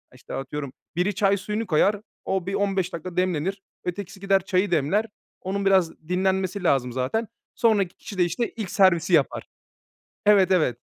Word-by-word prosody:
İşte, 125 Hz, -, -11 dB
atıyorum 135 Hz, 0 st, -5 dB, 0.2 s
biri 180 Hz, +3 st, 0 dB
çay 200 Hz, 0 st, +3 dB
suyunu 210 Hz, +3 st, -3 dB
koyar 200 Hz, +5 st, +2 dB, 0.2 s
o 190 Hz, -2 st, -1 dB
bir 195 Hz, -, -3 dB
15 195 Hz, -2 st, 0 dB
dakika 170 Hz, +2 st, -6 dB
demlenir. 185 Hz, +2 st, 0 dB, 0.2 s
Ötekisi 190 Hz, +1 st, -5 dB
gider 195 Hz, -1 st, +2 dB
çayı 190 Hz, 0 st, +1 dB
demler. 170 Hz, +8 st, +2 dB, 0.4 s
Onun 200 Hz, +1 st, -2 dB
biraz 190 Hz, -4 st, +4 dB, 0.2 s
dinlenmesi 190 Hz, +1 st, 0 dB
lazım 125 Hz, -6 st, +2 dB
zaten. 130 Hz, -, -1 dB, 0.3 s
Sonraki 205 Hz, -6 st, +2 dB
kişi 200 Hz, -, -9 dB
de, 180 Hz, -, +4 dB
işte, 180 Hz, +8 st, -1 dB
ilk 215 Hz, -5 st, -5 dB
servisi 185 Hz, -5 st, +3 dB
yapar. -, -, +2 dB, 0.8 s
Evet, 195 Hz, -3 st, +6 dB
evet. 155 Hz, -10 st, +2 dB
190 Hz, 160 wpm, -24 LUFS, 170-200 Hz, 0.8 s, Evet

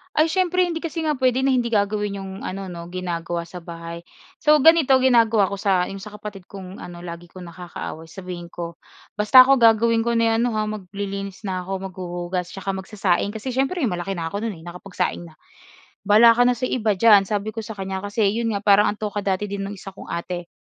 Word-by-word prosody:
Ay, 315 Hz, +1 st, +3 dB
siyempre 365 Hz, -1 st, +2 dB
hindi 335 Hz, -2 st, -2 dB
kasi 330 Hz, -1 st, -4 dB
nga 300 Hz, -3 st, 0 dB
puwede 260 Hz, 0 st, +2 dB
na 270 Hz, -, +3 dB
hindi 245 Hz, -2 st, +1 dB
gagawin 205 Hz, -2 st, 0 dB
'yong 190 Hz, 0 st, -7 dB
ano 190 Hz, -1 st, -5 dB
'no, 170 Hz, 0 st, -8 dB
ginagawa 175 Hz, -1 st, -4 dB
sa 175 Hz, +1 st, -9 dB
bahay. 170 Hz, 0 st, -9 dB, 0.3 s
So, 300 Hz, 0 st, +5 dB
ganito 320 Hz, -5 st, +6 dB
ginagawa 230 Hz, -5 st, +4 dB
ko 200 Hz, -, -3 dB
sa 190 Hz, -3 st, +2 dB
'yong 195 Hz, -, -7 dB
sa 210 Hz, +1 st, -10 dB
kapatid 205 Hz, -3 st, -9 dB
kong 190 Hz, -1 st, -10 dB
ano, 175 Hz, 0 st, -9 dB
lagi 170 Hz, 0 st, -8 dB
kong 185 Hz, +1 st, -11 dB
nakakaaway 170 Hz, -2 st, -8 dB
sabihin 180 Hz, -1 st, -8 dB
ko, 170 Hz, -1 st, -7 dB, 0.4 s
"Basta 255 Hz, +5 st, +8 dB
ako 270 Hz, 0 st, +4 dB
gagawin 230 Hz, 0 st, +4 dB
ko 235 Hz, -, +1 dB
na 230 Hz, 0 st, +3 dB
yung -, -, +2 dB
ano -, -, +2 dB
ha, 215 Hz, -, +1 dB
maglilinis 200 Hz, 0 st, -6 dB
na 185 Hz, -2 st, -2 dB
ako, 195 Hz, -, -7 dB, 0.2 s
maghuhugas, 175 Hz, 0 st, -4 dB
tsaka 195 Hz, 0 st, -3 dB
magsasaing." 190 Hz, 0 st, -1 dB
kasi 250 Hz, +4 st, -4 dB
siyempre 270 Hz, +6 st, 0 dB
malaki 190 Hz, -3 st, -2 dB
na 165 Hz, -1 st, -4 dB
ako 200 Hz, -, -3 dB
no'n 215 Hz, -5 st, -3 dB
nakapagsaing 175 Hz, 0 st, -4 dB
na, 155 Hz, -, -17 dB, 0.7 s
"Bahala 225 Hz, +3 st, +8 dB
ka 245 Hz, -, +4 dB
na 250 Hz, -, +3 dB
sa 255 Hz, +2 st, -2 dB
iba 215 Hz, -4 st, +1 dB
diyan." 200 Hz, -1 st, +6 dB
sabi 210 Hz, +1 st, -2 dB
ko 225 Hz, -, -6 dB
sa 220 Hz, 0 st, -7 dB
kanya 190 Hz, -1 st, -4 dB
kasi 205 Hz, +2 st, -2 dB
'yon 230 Hz, +1 st, -1 dB
nga, 200 Hz, -, -2 dB
parang 205 Hz, +1 st, +5 dB
ang -, -, -29 dB
toka 210 Hz, -1 st, -3 dB
dati 195 Hz, 0 st, -1 dB
din 200 Hz, -1 st, -4 dB
ng 205 Hz, -, -6 dB
isa 195 Hz, 0 st, -9 dB
kong 195 Hz, -, -12 dB
ate, 175 Hz, 0 st, -5 dB
200 Hz, 215 wpm, -22 LUFS, 180-230 Hz, 0.7 s, Basta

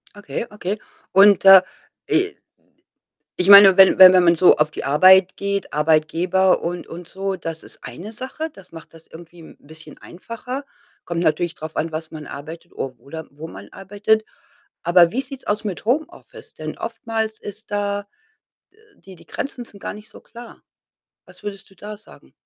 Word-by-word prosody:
Okay, 205 Hz, +2 st, -6 dB
okay. 210 Hz, 0 st, -4 dB, 0.4 s
Und, 200 Hz, +1 st, +5 dB
äh, 195 Hz, -1 st, +10 dB, 0.5 s
i 395 Hz, +2 st, 0 dB, 1.0 s
ich 180 Hz, +2 st, +1 dB
meine, 200 Hz, -2 st, +9 dB
wenn 190 Hz, -1 st, +6 dB
wenn 185 Hz, -1 st, +10 dB
wenn 180 Hz, -1 st, +5 dB
man 170 Hz, -1 st, +5 dB
so 180 Hz, +2 st, +5 dB
auf 150 Hz, 0 st, +1 dB
die -, -, -7 dB
Arbeit 185 Hz, +6 st, +5 dB
geht, 200 Hz, 0 st, -3 dB
Arbeitgeber 165 Hz, +5 st, +1 dB
und 175 Hz, +1 st, -5 dB
und 170 Hz, 0 st, -10 dB
so, 195 Hz, 0 st, -4 dB
das 165 Hz, -2 st, -7 dB
ist -, -, -13 dB
eine 200 Hz, +6 st, -9 dB
Sache. 265 Hz, +7 st, -6 dB
Das 195 Hz, -8 st, -18 dB
macht 165 Hz, 0 st, -13 dB
das 165 Hz, -, -17 dB
irgendwie 170 Hz, +1 st, -14 dB
'n 160 Hz, -, -15 dB
bisschen 155 Hz, 0 st, -15 dB
einfacher. 245 Hz, +8 st, -8 dB, 0.4 s
Kommt 170 Hz, -1 st, -3 dB
natürlich 165 Hz, +2 st, 0 dB
drauf 155 Hz, +1 st, -9 dB
an, 165 Hz, +1 st, -2 dB
was 155 Hz, 0 st, -6 dB
man 155 Hz, -2 st, -9 dB
arbeitet 160 Hz, +4 st, -10 dB
o 130 Hz, -1 st, -6 dB
oder 160 Hz, +6 st, -10 dB
wo 150 Hz, +3 st, -10 dB
man 100 Hz, -7 st, -12 dB
arbeitet. 205 Hz, +3 st, -1 dB, 0.6 s
Aber 175 Hz, 0 st, +4 dB
wie 255 Hz, -, -2 dB
sieht's 270 Hz, 0 st, -11 dB
aus 210 Hz, +1 st, -1 dB
mit 195 Hz, -2 st, -6 dB
Homeoffice? 310 Hz, +8 st, -4 dB
Denn -, -, -7 dB
oftmals 220 Hz, -1 st, -4 dB
ist 205 Hz, +1 st, -10 dB
da 205 Hz, 0 st, -3 dB, 0.7 s
d -, -, -30 dB, 0.2 s
die 190 Hz, -1 st, -14 dB
die -, -, -20 dB
Grenzen 255 Hz, -3 st, -6 dB
sind 200 Hz, -3 st, -16 dB
gar -, -, -6 dB
nicht 210 Hz, +1 st, -14 dB
so -, -, -15 dB
klar. 235 Hz, +1 st, -14 dB, 0.6 s
Was -, -, -17 dB
würdest 200 Hz, -2 st, -8 dB
du -, -, -21 dB
da 210 Hz, +3 st, -9 dB
sagen? 215 Hz, -, -19 dB
190 Hz, 180 wpm, -20 LUFS, 165-210 Hz, 1.0 s, äh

